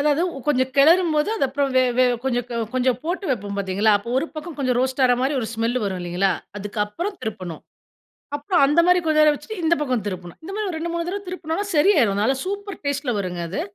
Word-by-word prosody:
அதாவது 295 Hz, +3 st, +2 dB, 0.3 s
கொஞ்சம் 260 Hz, -2 st, +2 dB
கெளறும்போது 315 Hz, +2 st, +4 dB
அதுக்கப்புறம் 275 Hz, -3 st, 0 dB
வே 255 Hz, -, +6 dB, 0.2 s
வே 255 Hz, -, +6 dB, 0.2 s
கொஞ்சம் 245 Hz, -2 st, 0 dB, 0.3 s
கொஞ்சம் 255 Hz, -1 st, +1 dB
போட்டு 365 Hz, +4 st, -2 dB
வெப்போம் 205 Hz, -4 st, -2 dB
பார்த்தீங்களா, 200 Hz, +2 st, +2 dB
அப்போ 235 Hz, +4 st, -8 dB
ஒரு 320 Hz, -, -1 dB
பக்கம் 310 Hz, +1 st, -7 dB
கொஞ்சம் 255 Hz, -3 st, +1 dB
ரோஸ்ட் 260 Hz, +1 st, -1 dB
ஆகுற 245 Hz, -1 st, +5 dB
மாரி 275 Hz, +3 st, +1 dB
ஒரு 225 Hz, -, -3 dB
ஸ்மெல் 230 Hz, +3 st, 0 dB
வரும் 190 Hz, -2 st, -3 dB
இல்லைங்களா? 180 Hz, +2 st, +1 dB, 0.3 s
அதுக்கப்புறம் 210 Hz, -, -3 dB
திருப்பணும். 185 Hz, -7 st, -5 dB, 0.8 s
அப்புறம் 295 Hz, +1 st, +2 dB
அந்த 295 Hz, +4 st, +3 dB
மாரி 360 Hz, 0 st, +5 dB
கொஞ்சம் 310 Hz, -1 st, +4 dB
நேரம் 300 Hz, -1 st, +5 dB
வெச்சுட்டு 365 Hz, +6 st, -7 dB
இந்த 330 Hz, +1 st, +4 dB
பக்கம் 250 Hz, -7 st, -1 dB
திருப்பணும். 180 Hz, -3 st, -6 dB
இந்த 380 Hz, -, -7 dB
மாரி 425 Hz, -2 st, -2 dB
ஒரு 320 Hz, -, -4 dB
2 340 Hz, +1 st, -3 dB
3 340 Hz, 0 st, -2 dB
தடவ 400 Hz, +1 st, -4 dB
திருப்பினோம்னா 360 Hz, +2 st, -3 dB
சரியாரும். 295 Hz, -, +4 dB
அதனால 220 Hz, +7 st, +2 dB
சூப்பர் 400 Hz, -1 st, -5 dB
டேஸ்ட்ல 280 Hz, -3 st, -1 dB
வருங்க 180 Hz, -2 st, -3 dB
அது. 190 Hz, -, -2 dB
275 Hz, 200 wpm, -22 LUFS, 220-330 Hz, 0.8 s, வே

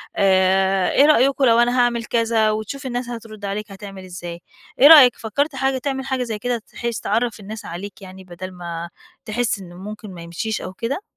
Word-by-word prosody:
آآ 190 Hz, 0 st, +3 dB
إيه 280 Hz, -, +5 dB
رأيكم 275 Hz, -2 st, +4 dB
لو 230 Hz, -1 st, +5 dB
أنا 245 Hz, +1 st, +3 dB
هاعمل 240 Hz, -1 st, +1 dB
كذا؟ 225 Hz, -2 st, +2 dB
وتشوف 220 Hz, +6 st, -5 dB
الناس 245 Hz, -1 st, -3 dB
هترُد 220 Hz, -3 st, -8 dB
عليك 205 Hz, +2 st, -4 dB
هتعمل 195 Hz, -1 st, -9 dB
إزاي. 175 Hz, -1 st, -8 dB, 0.4 s
إيه 280 Hz, -, +9 dB
رأيك، 285 Hz, -7 st, +9 dB
فكرت 280 Hz, +6 st, -2 dB
حاجة 265 Hz, 0 st, 0 dB
تعمل 265 Hz, 0 st, -3 dB
حاجة 265 Hz, -1 st, -1 dB
زي 225 Hz, -3 st, -4 dB
كده 245 Hz, +1 st, -2 dB
تحِس 235 Hz, -2 st, -3 dB
تعرّف 225 Hz, +1 st, -1 dB
الناس 210 Hz, +1 st, -8 dB
عليك 195 Hz, +4 st, -8 dB
يعني 190 Hz, 0 st, -11 dB
بَدَل 185 Hz, +1 st, -8 dB
ما 170 Hz, -1 st, -6 dB, 0.4 s
تحِس 225 Hz, -1 st, -1 dB
إن 180 Hz, -2 st, -11 dB
ممكن 205 Hz, +2 st, -9 dB
ما 170 Hz, -, -10 dB
يمشيش 170 Hz, +6 st, -4 dB
أو 185 Hz, -, -7 dB
كده؟ 240 Hz, -, -3 dB
220 Hz, 190 wpm, -21 LUFS, 190-245 Hz, 0.4 s, إيه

